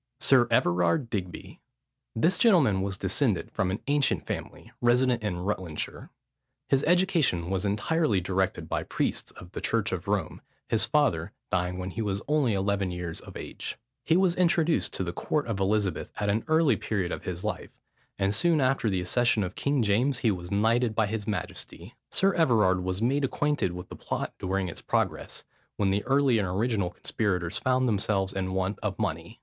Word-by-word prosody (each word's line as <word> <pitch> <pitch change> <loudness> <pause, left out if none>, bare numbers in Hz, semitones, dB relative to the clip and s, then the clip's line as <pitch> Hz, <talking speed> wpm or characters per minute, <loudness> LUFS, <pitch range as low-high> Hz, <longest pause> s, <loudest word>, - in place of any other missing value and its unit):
SIR 125 -3 +5
EVERARD 90 - +2
DIGBY. 90 -4 -5 0.6
This 170 +10 +2
gentleman 160 - +4
was 95 0 -2
descended - - 0
from 95 - 0
an 95 +4 -3
ancient 145 0 +1
family, - - -6
resident 120 0 +3
in 105 -4 -2
Rutlandshire. 90 -3 -4 0.6
His 135 +1 +3
education 165 - +2
was 95 +1 0
entirely 105 - +1
directed 95 -2 -1
by - - -1
priests - - -2
of 90 - -12
the - - -6
church 115 -1 0
of 90 0 -4
Rome, 100 -5 -1 0.3
his - - +1
father - - +1 0.2
dying 90 0 0
when 95 0 -4
he 115 - -4
was 100 -2 -2
only 145 -7 +2
eleven 100 0 0
years 90 -2 -5
of - - -10
age. - - -6 0.3
He 165 - +3
was 185 -2 +3
introduced 170 -2 +2
to - - -2
the 85 -1 -4
court 150 - -1
of 115 -4 -3
Elizabeth 95 -4 0
at 105 - 0
an 110 +3 0
early 160 -2 +3
period 95 -5 -2
of - - -5
his 90 +1 -4
life; 105 - -5 0.4
and 95 0 +1
soon 170 +4 +2
after 130 -4 +2
the 95 -2 0
accession 115 +3 +2
of 90 0 -4
King 140 0 0
James 120 +6 +1
was 90 -6 0
knighted 115 +3 +2
by 110 - +3
his 105 0 -4
majesty. 105 -5 -5 0.2
Sir 195 0 +2
Everard 105 - +3
was 95 +3 -2
made 140 +4 +2
acquainted 145 -7 0
with 90 0 -8
the - - -8
plot - - -4
during 95 0 -1
its 85 - -7
progress, - - -2 0.3
when 100 -2 +2
the 100 +1 0
early 135 -3 +3
and 100 - 0
original 100 0 0
conspirators 90 -2 -2
found 130 0 +2
themselves 95 -3 0
in 95 -1 -2
want 95 +1 -1
of - - -3
money. - - -3
105 Hz, 180 wpm, -27 LUFS, 95-130 Hz, 0.6 s, SIR